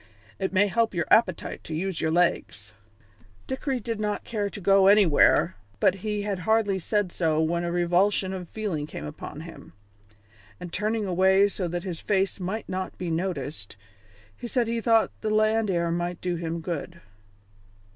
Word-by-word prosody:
"It 190 Hz, -, -1 dB
may 195 Hz, +1 st, +4 dB
help 225 Hz, 0 st, 0 dB
your 170 Hz, -, 0 dB
appetite 185 Hz, -7 st, +2 dB
to 160 Hz, -, -5 dB
use 185 Hz, +1 st, -2 dB
your 160 Hz, -, +1 dB
legs." 160 Hz, -, 0 dB, 0.7 s
Dickory 265 Hz, 0 st, -2 dB
did 225 Hz, -1 st, -4 dB
not 210 Hz, -1 st, -2 dB
care 210 Hz, -3 st, -2 dB
to 200 Hz, -, -8 dB
go 195 Hz, 0 st, +4 dB
anywhere, 195 Hz, -3 st, +5 dB, 0.2 s
but -, -, +4 dB
he 210 Hz, -1 st, -2 dB
had 200 Hz, -2 st, -2 dB
hardly 205 Hz, +1 st, +1 dB
said 205 Hz, +1 st, -1 dB
so 160 Hz, -3 st, 0 dB
when 170 Hz, +2 st, 0 dB
a 170 Hz, -, -2 dB
revulsion 180 Hz, +3 st, +2 dB
of 180 Hz, -3 st, -6 dB
feeling 185 Hz, -9 st, -3 dB
came 75 Hz, -, -7 dB
upon 75 Hz, -, -8 dB
him, -, -, -12 dB, 0.9 s
and 175 Hz, -, -8 dB
turning 215 Hz, +1 st, -1 dB
away 190 Hz, +2 st, +4 dB
so 195 Hz, -3 st, -3 dB
that 175 Hz, +1 st, -4 dB
his 175 Hz, -4 st, -5 dB
face 195 Hz, -1 st, 0 dB
might 190 Hz, +5 st, -4 dB
not 185 Hz, 0 st, -4 dB
be 180 Hz, -2 st, -3 dB
noticed, 150 Hz, -, -4 dB, 0.6 s
he 240 Hz, -, -7 dB
said 240 Hz, -1 st, 0 dB
he 230 Hz, 0 st, -1 dB
thought 225 Hz, -1 st, +3 dB
the 215 Hz, -, -1 dB
land 215 Hz, 0 st, +2 dB
air 170 Hz, -2 st, 0 dB
might 175 Hz, +1 st, -2 dB
do 180 Hz, -1 st, -2 dB
him 165 Hz, 0 st, -4 dB
good. 170 Hz, 0 st, -5 dB
190 Hz, 175 wpm, -26 LUFS, 170-210 Hz, 0.9 s, anywhere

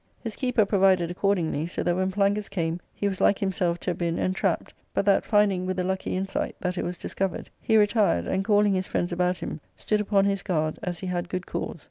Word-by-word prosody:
His 225 Hz, -3 st, -6 dB
keeper 250 Hz, -5 st, +2 dB
provided 190 Hz, -4 st, +3 dB
accordingly, 175 Hz, -5 st, 0 dB
so 175 Hz, -, -3 dB
that 175 Hz, -, +1 dB
when 185 Hz, +1 st, +1 dB
Plangus 200 Hz, +1 st, +1 dB
came 170 Hz, -3 st, -2 dB, 0.2 s
he 205 Hz, -, -1 dB
was 190 Hz, -2 st, -3 dB
like 200 Hz, -, +4 dB
himself 180 Hz, -3 st, 0 dB
to 180 Hz, -, -1 dB
have 175 Hz, -, -6 dB
been 170 Hz, -1 st, 0 dB
entrapped, 185 Hz, +1 st, -1 dB, 0.2 s
but -, -, +1 dB
that, 200 Hz, -1 st, +4 dB
finding, 200 Hz, -3 st, +2 dB
with 185 Hz, 0 st, -2 dB
a 180 Hz, -, 0 dB
lucky 190 Hz, 0 st, -2 dB
insight, 195 Hz, +1 st, -2 dB
that 180 Hz, 0 st, -2 dB
it -, -, -2 dB
was 175 Hz, 0 st, -4 dB
discovered, 195 Hz, -2 st, -3 dB
he 220 Hz, -, +3 dB
retired, 205 Hz, -, +3 dB
and, 190 Hz, -, 0 dB
calling 205 Hz, 0 st, +3 dB
his 185 Hz, 0 st, -1 dB
friends 175 Hz, -, -1 dB
about 180 Hz, +1 st, +1 dB
him, 155 Hz, -, -6 dB
stood 210 Hz, -1 st, 0 dB
upon 200 Hz, -1 st, +2 dB
his 200 Hz, -1 st, 0 dB
guard, 155 Hz, -3 st, -1 dB
as 175 Hz, -1 st, -3 dB
he -, -, -7 dB
had 175 Hz, -1 st, -2 dB
good 185 Hz, -1 st, -3 dB
cause. -, -, -4 dB
190 Hz, 225 wpm, -26 LUFS, 175-200 Hz, 0.2 s, like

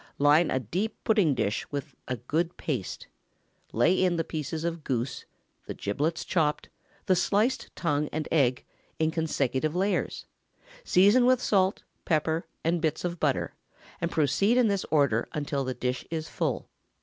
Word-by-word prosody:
Line 150 Hz, +4 st, +5 dB
a 130 Hz, -, +1 dB
deep 185 Hz, -, -2 dB
pudding 200 Hz, -10 st, +3 dB
dish 105 Hz, -2 st, -1 dB
with 145 Hz, -1 st, -4 dB
a 125 Hz, -, -2 dB
good 160 Hz, +9 st, -2 dB
paste; 125 Hz, -, -4 dB, 0.7 s
lay 135 Hz, +11 st, +3 dB
in 180 Hz, -2 st, +2 dB
the 165 Hz, -, 0 dB
pieces 155 Hz, 0 st, -4 dB
of 170 Hz, -2 st, -3 dB
goose, 125 Hz, -1 st, -2 dB, 0.4 s
the -, -, -5 dB
giblets 145 Hz, +11 st, -2 dB
chopped, 155 Hz, -4 st, 0 dB, 0.4 s
the 185 Hz, -, +4 dB
sliced 215 Hz, +8 st, +1 dB
tongue 150 Hz, -3 st, 0 dB
and 155 Hz, 0 st, -3 dB
egg, 130 Hz, -6 st, +2 dB, 0.3 s
in 160 Hz, 0 st, +1 dB
consecutive 155 Hz, -2 st, -1 dB
layers; 195 Hz, +3 st, -1 dB, 0.6 s
season 205 Hz, -, +5 dB
with 255 Hz, 0 st, +5 dB, 0.7 s
pepper, 160 Hz, 0 st, 0 dB
salt, -, -, -45 dB
and 165 Hz, +1 st, +1 dB
bits 160 Hz, +1 st, -1 dB
of 175 Hz, -1 st, -3 dB
butter, 145 Hz, -3 st, 0 dB, 0.5 s
and 170 Hz, -, 0 dB
proceed 175 Hz, -, +2 dB
in 245 Hz, -3 st, +4 dB
this 200 Hz, -2 st, 0 dB
order 140 Hz, -7 st, +2 dB
until 145 Hz, -2 st, -2 dB
the 130 Hz, -1 st, -3 dB
dish 125 Hz, 0 st, -2 dB
is 160 Hz, -1 st, -3 dB
full. -, -, -2 dB
155 Hz, 155 wpm, -28 LUFS, 140-175 Hz, 0.7 s, Line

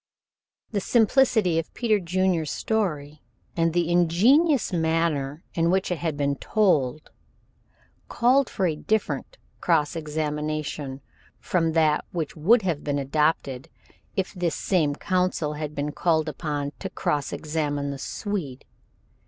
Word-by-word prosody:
The 205 Hz, -3 st, -1 dB
simplicity 220 Hz, -6 st, +3 dB
of 165 Hz, -, -6 dB
Peter 220 Hz, -4 st, +2 dB
Junior's 180 Hz, -3 st, 0 dB
story, 155 Hz, -9 st, -2 dB, 0.3 s
and 165 Hz, 0 st, +2 dB
the 175 Hz, 0 st, 0 dB
ingenuous 220 Hz, -, +4 dB
manner 160 Hz, -3 st, 0 dB
in 165 Hz, 0 st, +1 dB
which 190 Hz, +1 st, +1 dB
it 175 Hz, -, -1 dB
had 160 Hz, -4 st, -2 dB
been 140 Hz, -1 st, 0 dB
told, 155 Hz, -10 st, +1 dB, 1.0 s
called 255 Hz, +3 st, +3 dB
for 190 Hz, -, -1 dB
a 160 Hz, -3 st, +1 dB
different 220 Hz, -, -2 dB, 0.2 s
cross 160 Hz, -2 st, +1 dB
examination 150 Hz, -2 st, -3 dB, 0.4 s
from 165 Hz, -3 st, 0 dB
that 155 Hz, -2 st, +3 dB
which 165 Hz, -3 st, -3 dB
would 210 Hz, +9 st, +4 dB
have 165 Hz, -6 st, -1 dB
been 145 Hz, -1 st, -1 dB
adopted 140 Hz, -2 st, 0 dB, 0.5 s
if 190 Hz, -1 st, -2 dB
this 175 Hz, -3 st, -1 dB
same 155 Hz, -7 st, +1 dB
counsel 180 Hz, -4 st, 0 dB
had 150 Hz, 0 st, -5 dB
been 145 Hz, +1 st, -2 dB
called 160 Hz, 0 st, +1 dB
upon 145 Hz, -1 st, -3 dB
to -, -, -4 dB
cross 145 Hz, -2 st, -1 dB
examine 145 Hz, -2 st, -2 dB
the 140 Hz, -, -6 dB
Swede. 165 Hz, -, -4 dB
160 Hz, 130 wpm, -25 LUFS, 150-185 Hz, 1.0 s, ingenuous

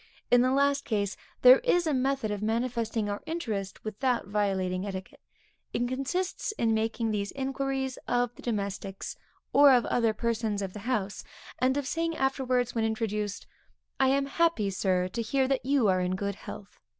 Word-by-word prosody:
In 245 Hz, -, +7 dB
the 255 Hz, -, +3 dB
last 280 Hz, +1 st, +2 dB
case, 205 Hz, -3 st, -1 dB, 0.3 s
there 255 Hz, +1 st, +10 dB
is 355 Hz, -9 st, +2 dB
a 310 Hz, -, +1 dB
method 265 Hz, -4 st, 0 dB
of 205 Hz, -1 st, -3 dB
manifesting 230 Hz, -1 st, -1 dB
our 205 Hz, 0 st, -3 dB
interest, 220 Hz, -, -4 dB
without 235 Hz, +3 st, 0 dB
violating 190 Hz, -2 st, 0 dB
etiquette; 190 Hz, -2 st, -6 dB, 0.5 s
it 240 Hz, +1 st, 0 dB
consists 280 Hz, -, -2 dB
in 230 Hz, -, +1 dB
making 225 Hz, +1 st, 0 dB
these 200 Hz, -1 st, -2 dB
inquiries 270 Hz, -1 st, -2 dB
of 245 Hz, -1 st, +1 dB
the -, -, -14 dB
domestics, 200 Hz, -3 st, -4 dB, 0.4 s
or 285 Hz, 0 st, +8 dB
of 245 Hz, -2 st, +4 dB
other 230 Hz, -2 st, +2 dB
persons 220 Hz, -3 st, -1 dB
of 190 Hz, -1 st, -5 dB
the 210 Hz, +4 st, -6 dB
house, 205 Hz, -4 st, -2 dB, 0.4 s
and 260 Hz, +2 st, +2 dB
of 285 Hz, -, -1 dB
saying 330 Hz, +3 st, -1 dB
afterwards 255 Hz, -2 st, 0 dB
when 225 Hz, -, 0 dB
introduced; 210 Hz, -2 st, -2 dB, 0.5 s
'I 265 Hz, -, +4 dB
am 275 Hz, +1 st, +2 dB
happy 275 Hz, -9 st, +1 dB
Sir, 185 Hz, -1 st, +1 dB
to 230 Hz, -, -3 dB
hear 265 Hz, +4 st, +1 dB
that 265 Hz, -1 st, -1 dB
you 275 Hz, -5 st, +3 dB
are 185 Hz, -1 st, +3 dB
in 180 Hz, +1 st, 0 dB
good 200 Hz, +1 st, -2 dB
health.' 200 Hz, +1 st, -10 dB
235 Hz, 175 wpm, -28 LUFS, 205-270 Hz, 0.5 s, there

